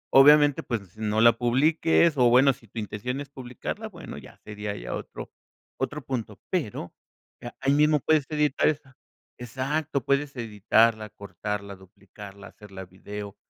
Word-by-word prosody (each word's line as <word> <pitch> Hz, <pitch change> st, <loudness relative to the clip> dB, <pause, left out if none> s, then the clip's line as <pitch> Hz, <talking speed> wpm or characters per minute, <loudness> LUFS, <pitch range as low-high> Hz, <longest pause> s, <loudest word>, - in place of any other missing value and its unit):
Obviamente 145 Hz, +1 st, +7 dB
pues, 105 Hz, -7 st, -5 dB
no 110 Hz, 0 st, -1 dB
la 115 Hz, 0 st, +7 dB
publiques, 155 Hz, +6 st, +3 dB
o, 120 Hz, -1 st, +5 dB
bueno 130 Hz, +2 st, +5 dB
si 115 Hz, -, -20 dB
tu 115 Hz, -, -14 dB
intención 110 Hz, +5 st, -4 dB
es 140 Hz, -, -9 dB
publicarla 125 Hz, -3 st, -6 dB
bueno -, -, -10 dB
ya -, -, -15 dB
sería 105 Hz, -1 st, -5 dB
ya -, -, -6 dB
otro -, -, -7 dB, 0.5 s
otro 145 Hz, +2 st, -3 dB
punto, 115 Hz, -6 st, -4 dB
pero 135 Hz, -, -3 dB, 0.7 s
ahí 135 Hz, +1 st, +2 dB
mismo 150 Hz, 0 st, +4 dB
puedes 155 Hz, 0 st, +2 dB
editar 150 Hz, -2 st, +1 dB
esa. 140 Hz, -3 st, -2 dB, 0.4 s
Exacto, 135 Hz, +3 st, -3 dB
puedes 140 Hz, 0 st, 0 dB
editarla, 110 Hz, -1 st, +2 dB
cortarla, 100 Hz, +1 st, -6 dB
duplicarla, 100 Hz, +1 st, -13 dB
hacerla 95 Hz, -2 st, -11 dB
video, 100 Hz, +2 st, -9 dB
120 Hz, 140 wpm, -26 LUFS, 105-140 Hz, 0.7 s, Obviamente